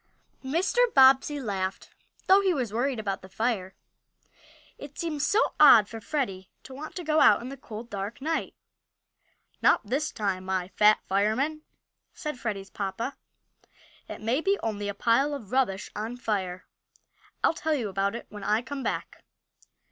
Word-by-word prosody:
MR. 380 - +1
BOBBSEY 270 +2 +6
laughed, 195 -6 -4 0.3
though 385 +1 +6
he 380 -3 +2
was 245 -7 -2
worried 250 +3 0
about 200 -2 -3
the 190 - -13
fire. 195 -3 -2 1.0
It 285 0 -10
seemed 315 -4 -3
so 410 +10 +2
odd 240 -9 +8
for 225 0 -8
Freddie 200 -7 -3
to 265 - -11
want 300 +4 -8
to 360 - -5
go 310 0 +2
out - - +6
in 245 - -7
the 275 - -7
cold, 230 -3 -9
dark 200 +2 -5
night. 320 +4 -2 1.1
"Not - - +4
this 275 +8 -1
time, 195 -3 -2
my 185 -1 -2
Fat 210 +1 +4
Fireman!" 220 +11 0 0.5
said 300 -4 -5
Freddie's 195 -4 -4
papa. 210 +7 -4 0.9
"It - - -7
may 235 +7 0
be 395 +3 +2
only 205 -2 -2
a 200 - -4
pile 270 +6 +2
of 225 -8 -10
rubbish 245 -7 0
on 225 +4 -4
fire. 190 -6 -3 0.8
I'll - - +4
tell 315 -1 -1
you 240 -7 -2
about 195 +2 -1
it 235 - -7
when 210 -1 -9
I 210 +4 +1
come 275 +1 -6
back." - - -4
235 Hz, 165 wpm, -27 LUFS, 200-285 Hz, 1.1 s, odd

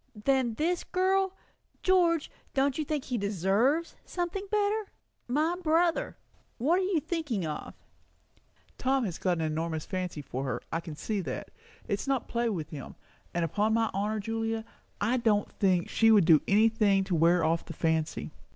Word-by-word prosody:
"Than 245 +1 +1
this 345 +7 0
girl? 380 +1 +1 0.5
George, 345 -4 +3 0.2
don't 275 +1 +2
you - - +1
think 300 -2 -2
he 245 -3 -2
deserves 205 - +1
something 360 +3 -3
better? 420 0 +1 0.4
My 305 +7 +1
brother? 330 +1 +1 0.4
What 320 +10 +2
are - - 0
you 370 -3 +1
thinking 300 - -2
of?" 155 - -5 1.0
"Tom 265 0 +2
has 175 -5 -4
got 180 -2 +1
an 165 - -1
enormous 160 0 -2
fancy 180 -5 -4
for 130 0 -4
her; 135 - -2
I 165 - 0
can 165 -2 -8
see 205 +6 -2
that. - - -5 0.4
It's 200 +6 -2
not 270 -4 0
play 235 0 0
with 160 -7 -4
him. 145 -4 -8 0.4
And 170 -1 +1
upon 210 +7 +1
my 225 -1 +1
honour, 210 +2 -1
Julia, 225 +1 -2 0.3
I 230 +5 +1
do 225 -4 +3
not 205 - -3
think 185 -3 +1
she 225 - +3
would 210 -5 +6
do 160 -3 +6
any 210 +3 +5
thing 210 -4 +3
to 190 - -3
wear 170 +1 +4
off 165 +1 +1
the - - -7
fancy." 160 - -1
225 Hz, 175 wpm, -29 LUFS, -, 1.0 s, would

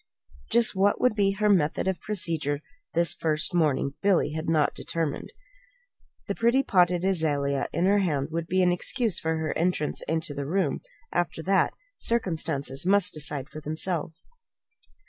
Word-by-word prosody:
Just 235 -3 +3
what 200 +2 +2
would 250 - +3
be 200 -2 +2
her 210 +1 0
method 180 -4 +2
of 190 -1 -1
procedure 165 -8 -2 0.3
this 170 0 +3
first 155 +1 0
morning, 145 -5 +1
Billy 195 -6 +2
had 160 +1 -4
not 155 -3 +2
determined. 160 -4 -3 1.0
The - - -2
pretty 235 +4 +2
potted 180 -5 +2
azalea 145 -7 0
in 170 - 0
her 200 +2 +4
hand 150 -8 0
would 165 0 -3
be 185 +1 +2
excuse 180 +4 +1
for 160 0 -1
her 160 0 -2
entrance 165 -3 0
into 160 -2 -1
the 140 -1 -4
room. 175 -3 0 0.3
After 175 -2 -2
that, 195 +2 +2 0.2
circumstances 160 - -1
must 200 +2 +3
decide 145 -2 -2
for 155 0 -9
themselves. 160 +1 -3
170 Hz, 150 wpm, -26 LUFS, 155-190 Hz, 1.0 s, her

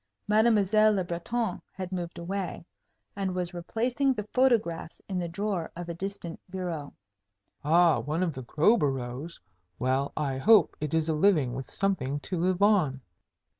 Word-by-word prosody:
Mademoiselle 215 -1 +4
Le 190 -2 0
Breton 180 +5 -2
had 185 -1 -6
moved 175 -2 -4
away, 180 0 -4 0.5
and 195 -2 -2
was 180 -1 -2
replacing 240 +9 0
the 210 -2 -5
photographs 225 -11 +1
in 185 -2 -2
the 175 - -2
drawer 185 0 -3
of 175 0 -6
a - - -2
distant 180 -1 -6
bureau. 175 -6 -4 0.7
"Ah, 165 +2 +4
one 155 +5 -1
of 170 -4 -1
Crowborough's? 145 - +1 0.4
Well, 130 +3 0
I 135 -3 -1
hope 215 +7 +5
it 150 +1 -1
is 160 -1 +1
a 160 - +1
living 155 -6 +3
with 130 0 -6
something 145 -9 -1
to 185 - -4
live 185 +2 +1
on." 180 -11 +3
175 Hz, 150 wpm, -28 LUFS, 155-200 Hz, 0.7 s, hope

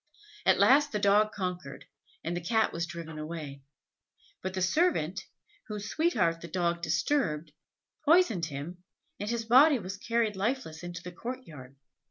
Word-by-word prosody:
At - - +6
last 290 +2 +5
the 210 - -1
dog 210 +1 +4
conquered, 180 -9 -5 0.4
and 170 +2 -2
the 175 - -3
Cat 220 +6 +1
was 170 +1 -2
driven 165 -2 -7
away; 155 -3 -6 0.8
but 190 0 -4
the - - -1
servant, 190 - +1 0.5
whose 210 -2 -5
sweetheart 170 - +1
the 170 - -7
dog 170 0 -1
disturbed, 165 - 0 0.5
poisoned 290 - +4
him, 160 +5 -7 0.4
and 205 - -3
his 235 -1 -2
body 265 +5 +6
was 190 -3 -6
carried 230 0 0
lifeless 200 -5 -2
into 175 0 -7
the 180 - -7
courtyard. 165 - -8
185 Hz, 150 wpm, -29 LUFS, 165-230 Hz, 0.8 s, At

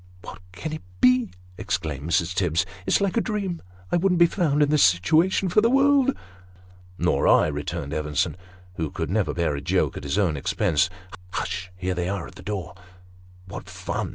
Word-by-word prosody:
" 90 - -24
What - - -9
can 155 - -6
it 155 - -5 0.2
be? 125 -2 +4 0.2
" 90 0 -25
exclaimed 80 -4 -3
Mrs. 85 +1 +1
Tibbs. 90 -1 +1
" 95 0 -18
It's - - +3
like 200 +2 0
a - - +4
dream. 200 -6 -3 0.3
I - - +3
wouldn't 180 0 +2
be 170 - +7
found 155 -4 +1
in 145 - +1
this 150 -1 +3
situation 160 - +3
for 185 +4 +3
the 230 - +3
world! 275 0 +4 0.3
" 90 0 -25
" 90 0 -25
Nor - - +1
I," - - +6
returned 75 0 -4
Evenson, 75 -2 -1 0.4
who 80 -2 -2
could 75 - -4
never 105 -1 +1
bear 85 -4 -1
a 70 - -5
joke - - 0
at - - -7
his 70 +6 -2
own 90 -8 +1
expense. 80 +5 +1 0.2
" 90 0 -15
Hush! 95 -1 -3
here 90 0 -2
they 90 0 -2
are 100 -3 -3
at - - -12
the - - -12
door." 100 -7 -5 0.4
" 90 0 -24
What - - -8
fun - - -4
90 Hz, 215 wpm, -24 LUFS, -, 0.4 s, be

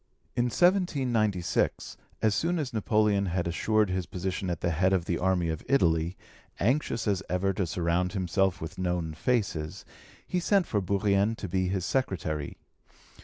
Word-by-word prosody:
In 120 - +2
1796, 125 - +1 0.3
as 110 -1 +4
soon 175 +7 0
as 140 -6 -3
Napoleon 105 -2 +2
had 90 -1 -1
assured 105 +4 +1
his 90 -2 -2
position 95 +1 -3
at 85 - -3
the 85 - +1
head 90 +4 +2
of 90 -3 +1
the 85 - -1
army 90 -2 +1
of 80 -1 -4
Italy, 85 -8 +2 0.4
anxious 120 -1 0
as 100 -2 +1
ever 95 +2 +1
to 95 -1 -1
surround 90 +2 0
himself 95 0 +1
with 85 +3 -7
known 90 -3 -1
faces, 85 -6 -1 0.4
he 180 - -1
sent 195 +1 +2
for 105 -8 0
Bourrienne 100 +2 +1
to 100 - -6
be 95 +1 0
his 95 -1 -1
secretary. 80 - -2
95 Hz, 160 wpm, -28 LUFS, 90-110 Hz, 0.4 s, as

